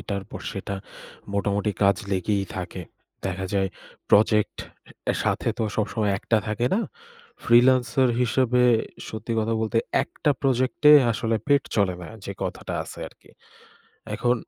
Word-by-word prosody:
এটার 100 -1 -4
পর - - -7
সেটা, 100 - -4 0.6
মোটামুটি 100 +1 0
কাজ 100 0 +5 0.2
লেগেই 100 +2 0
থাকে। 90 0 -5 0.4
দেখা 95 0 -3
যায় 95 -1 +2 0.4
প্রজেক্ট 105 0 +4 0.7
সাথে - - 0
তো - - 0
সবসময় 105 -1 0
একটা 115 - +1
থাকে 110 +3 0
না। 225 - +2 0.6
ফ্রীলান্সার 125 +1 +4
হিসেবে 125 0 +2 0.5
সত্যি 110 +2 -5
কথা 110 +1 0
বলতে 110 +1 +1 0.2
১টা 150 - -1
প্রজেক্টে 130 +3 +3 0.2
আসলে 115 +1 0
পেট 140 -1 +4
চলে 100 -4 +2
না - - -8 0.2
যে 100 - -4
কথাটা - - -4
আছে - - -10
আরকি। - - -23 0.9
এখন 125 0 +2
110 Hz, 135 wpm, -24 LUFS, 100-125 Hz, 0.9 s, কাজ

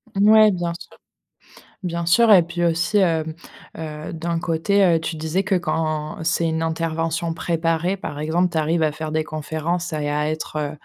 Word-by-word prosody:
Mouais, 215 +2 +6
bien 175 -2 -2
sûr. - - -14 0.9
Bien 170 -1 -3
sûr, 225 +6 +5
et 185 - +8
puis 175 +1 -3
aussi, 165 +5 +1
hem, 160 -4 +1 0.4
heu, 155 -1 -6
d'un 165 +1 -2
côté, 170 +5 +1
heu, 170 -3 +4
tu 160 0 -4
disais 160 +5 -1
que 200 0 -1
quand 155 -4 -1
c'est 165 0 +1
une 160 0 -1
intervention 165 +1 -2
préparée, 165 +2 0
par 185 -6 -7
exemple, 165 +4 +1
tu 165 - -2
arrives 160 +2 +1
à 155 -1 +2
faire 155 +1 -6
des 155 0 0
conférences 160 +3 -3
à 155 - -2
et 145 - -1
à 150 +1 0
être, 155 0 -6
heu 145 -1 -2
165 Hz, 190 wpm, -22 LUFS, 155-175 Hz, 0.9 s, et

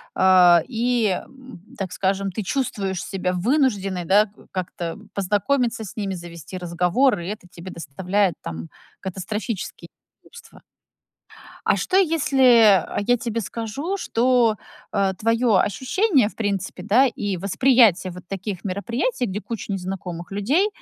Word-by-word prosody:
э, 180 -2 +6
и, 240 -1 +1 0.2
м, 260 -8 -14 0.2
так 190 -2 -4
скажем, 195 0 -1
ты 215 - -4
чувствуешь 195 -6 -2
себя 185 -2 -2
вынужденной, 195 - 0
да, 205 +4 +5
э, - - -19
как-то 180 0 -5
познакомиться 225 +5 0
с 215 - -10
ними, 200 -4 -3
завести 170 0 -9
разговор, 180 +8 +1
и 170 - -6
это 205 -2 -6
тебе 175 +2 -10
доставляет 180 +5 -1
там 80 0 -7 0.3
катастрофические 195 +3 -5 0.3
неудобства. 475 - -15 1.1
А - - +4
что 370 - 0
если, 255 - +5
э, - - -3
я 245 - +4
тебе 230 -2 -3
скажу, 230 - -4
что, 240 - +2 0.4
э, 195 -2 +1
твоё 230 -1 +2
ощущение, 260 - +2
в - - -17
принципе, 200 -3 -3
да, 225 +8 +4
и 205 -5 -2
восприятие 200 -2 +3
вот 180 -1 -11
таких 195 -1 -5
мероприятий, 235 - -2
где 200 0 -4
куча 220 -2 -6
незнакомых 180 -2 -5
людей, 275 - +2
205 Hz, 135 wpm, -22 LUFS, 185-245 Hz, 1.1 s, э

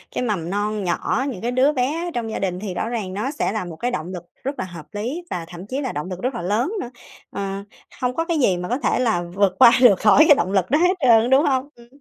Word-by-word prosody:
cái - - -1
mầm 185 -8 -2
non 205 +1 -2
nhỏ, 190 +8 -1
những 225 -9 -6
cái 240 - -1
đứa 260 +4 +3
bé 290 +6 -1
ở 345 - -4
trong 230 -2 -3
gia - - -3
đình 180 -2 -2
thì 195 -2 -5
rõ 225 - -3
ràng 215 -6 -4
nó 215 +8 -2
sẽ 290 - -1
là 215 -3 -3
một 170 -2 -8
cái 245 +10 -2
động 165 -9 -3
lực 175 -2 -6 0.2
rất 275 +2 -4
là - - -2
hợp 170 -4 -10
lý 235 +11 -4
và 170 -2 -4
thậm 175 +2 -10
chí 265 +5 -3
là 260 - -3
động 150 +5 -5
lực 185 -1 -6
rất 255 0 -2
là - - -4
lớn 210 - 0
nữa, 240 - -6 0.4
ờ, 195 0 -4 0.4
không 250 0 -1
có 330 - -1
cái 335 -2 -1
gì 195 -9 +3
mà 180 0 -5
có 250 - -1
thể 250 - 0
là 220 -8 +1
vượt 200 -2 +2
qua 245 -3 +9
được 205 -7 +6
khỏi 220 +8 +6
cái 295 - +8
động 185 -7 -1
lực 190 -3 +1
đó 295 - +4
hết 360 +2 +4
trơn 260 - +3
á, 230 - -1
đúng 265 +4 +4
hông? 265 0 0
Ừm. 235 0 -17
225 Hz, 295 wpm, -22 LUFS, 185-260 Hz, 0.4 s, qua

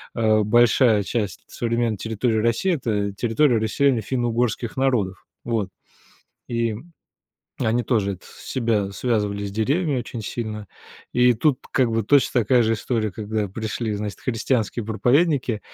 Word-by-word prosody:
э, 110 -2 +3
большая 120 -1 +4
часть 105 -1 -3
современной 115 -2 -1
территории 110 +2 -1
России- 115 - +1
это 105 -8 -1
территория 120 +4 +2
расселения 115 +2 +1
финно-угорских 120 -1 -1
народов. 115 -8 0 0.2
Вот. 110 -5 -1 0.8
И 115 -2 0 0.9
они 115 +2 +1
тоже 105 -5 0
это 90 - -18
с - - -14
себя 110 -6 0
связывали 105 -3 -1
с 100 - -4
деревьями 140 - 0
очень 115 -1 -6
сильно. 105 -3 -5 0.4
И 125 0 +5
тут 135 +3 +2
как 125 -4 +2
бы 115 0 0
точно 130 -2 +3
такая 120 +3 +4
же 115 0 +2
история, 110 -1 -1
когда 105 -1 -3
пришли, 110 +2 -3
значит, 105 -1 -5
христианские 115 -1 -1
проповедники, 120 - +1
115 Hz, 135 wpm, -23 LUFS, 105-125 Hz, 0.9 s, И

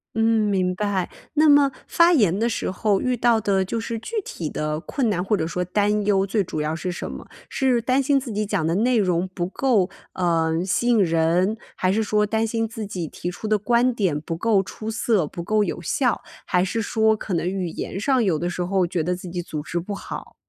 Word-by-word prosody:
嗯， 225 - +2 0.3
明 180 -1 +1
白， 200 -2 -1 0.3
那 310 +1 +5
么 285 -1 +6 0.2
发 340 +1 +5
言 205 - +3
的 230 +2 +1
时 225 - -2
候 195 +1 +1
遇 255 -1 0
到 235 -1 +3
的 195 -2 +1
就 225 +5 -3
是 230 0 -4
具 455 - -7
体 155 -3 -5
的 150 0 -2
困 250 0 -1
难 180 -3 0
或 205 +2 +1
者 160 - -1
说 180 +2 -2
担 205 +3 +1
忧， 195 -2 +3
最 205 0 +1
主 155 - -5
要 155 +1 -1
是 180 +2 -3
什 175 - -5
么？ - - -8 0.2
是 255 -3 +1
担 260 +3 +1
心 275 0 +3
自 260 - -7
己 210 +1 -1
讲 160 -5 -1
的 165 - +1
内 240 +4 +2
容 180 -3 +1
不 175 -1 -2
够， 205 -3 +1 0.2
呃， 165 -3 +1
吸 240 +6 +1
引 225 -4 +4
人， 170 +5 +2 0.2
还 185 +1 +1
是 220 - +1
说 210 0 +2
担 220 +1 0
心 225 0 -1
自 220 -1 -6
己 180 -5 -4
提 175 +4 -5
出 215 - -6
的 215 0 +3
观 240 +4 +2
点 185 -10 0
不 165 +2 -5
够 205 +2 +2
出 215 +3 -6
色、 215 -6 +1
不 170 - -7
够 210 +4 +1
有 170 - -3
效？ 245 - 0 0.2
还 180 -1 +2
是 225 +4 -2
说 220 +1 +2
可 205 -2 -5
能 170 +1 0
语 185 -3 -2
言 180 - -5
上 260 +4 +2
有 185 -8 +2
的 175 +3 -2
时 180 - -4
候 190 0 +1
觉 170 -1 -1
得 180 +3 -1
自 180 0 -8
己 175 0 -3
组 155 -3 -5
织 170 +3 -3
不 200 +4 -5
好？ - - -8
200 Hz, 250 characters per minute, -23 LUFS, 180-225 Hz, 0.3 s, 么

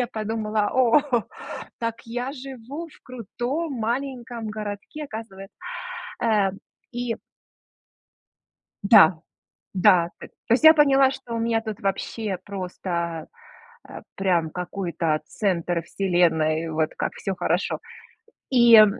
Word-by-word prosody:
Я 245 - +1
подумала, 215 -2 -1
"О, 255 +2 +5 0.8
так 230 0 -1
я 245 +3 -3
живу 270 +4 -8
в - - -20
крутом 255 - -4
маленьком 240 -1 -3
городке, 210 +7 -6
оказывается". 215 -6 -9 0.7
Э, 210 -4 +3 0.4
и 240 -1 -2 1.7
Да, 190 -6 +7 0.5
да, 180 -2 +5
т - - -9 0.2
то - - +4
есть 255 - +2
я 315 0 +11
поняла, 275 -3 +5
что 255 -3 -7
у 230 - -1
меня 225 0 +1
тут 220 -2 -6
вообще 195 +1 -2
просто, 180 -4 -4 0.6
э, - - -9
прям 175 -4 +1
какой-то 170 -2 -2
центр 175 -3 -1
вселенной, 165 -4 +1
вот 155 0 0
как - - -2
всё 195 - -3
хорошо. 180 +1 0 0.7
И, 240 -3 +7
э, 215 - +11
215 Hz, 115 wpm, -24 LUFS, 180-245 Hz, 1.7 s, я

